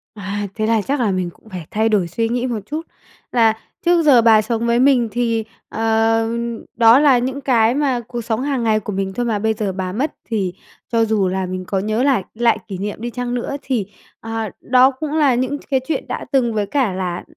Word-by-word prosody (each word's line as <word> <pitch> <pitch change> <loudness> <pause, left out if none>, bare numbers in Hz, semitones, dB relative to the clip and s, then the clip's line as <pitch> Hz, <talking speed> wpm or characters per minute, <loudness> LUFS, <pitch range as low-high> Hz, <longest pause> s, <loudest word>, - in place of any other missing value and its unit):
À, 205 0 -4
thế 215 - -1
là 225 -1 +2
chắc 275 +6 -2
là 225 -5 +1
mình 185 -2 -1
cũng 220 - -19
phải 180 -5 -7
thay 220 +1 +1
đổi 200 -5 +2
suy 225 +7 -1
nghĩ 245 +2 -1
một 235 -3 -2
chút, 310 +7 -5 0.5
là 225 -2 +4 0.3
trước 345 0 +4
giờ 275 -6 +6
bà 225 -2 +6
sống 230 +1 -2
với 235 0 +2
mình 255 -3 +4
thì, 230 -1 0 0.3
ờ, 225 0 +1 0.5
đó 230 +2 +6
là 285 -4 +5
những 260 +3 -2
cái 235 -3 +3
mà 275 -4 +1
cuộc 240 -1 -4
sống 225 +1 -2
hàng 270 -3 -1
ngày 220 -1 +2
của 210 0 -6
mình 190 0 -2
thôi 245 +4 -2
mà, 220 -3 0
bây 220 +1 +1
giờ 210 -3 -2
bà 185 -1 -3
mất 270 +10 -2
thì 195 -6 -2 0.4
cho 230 -1 +3
dù 215 -3 +1
là 190 +1 -1
mình 185 0 -5
có 195 - 0
nhớ 215 +5 0
lại 270 -8 +2
lại 235 +1 +2
kỷ 195 -4 -5
niệm 205 +3 -5
đi 240 - -3
chăng 245 0 -4
nữa 245 +3 -3
thì, 245 -8 -1 0.3
ờ, 225 -1 -4
đó 255 +1 +5
cũng 290 +3 -5
là 285 -5 +4
những 260 +4 -1
cái 270 -2 +2
chuyện 320 - -2
đã - - -4
từng, 250 -5 +2
với 210 -1 0
cả 250 -3 0
là 180 -2 -3
225 Hz, 230 wpm, -19 LUFS, 210-250 Hz, 0.5 s, giờ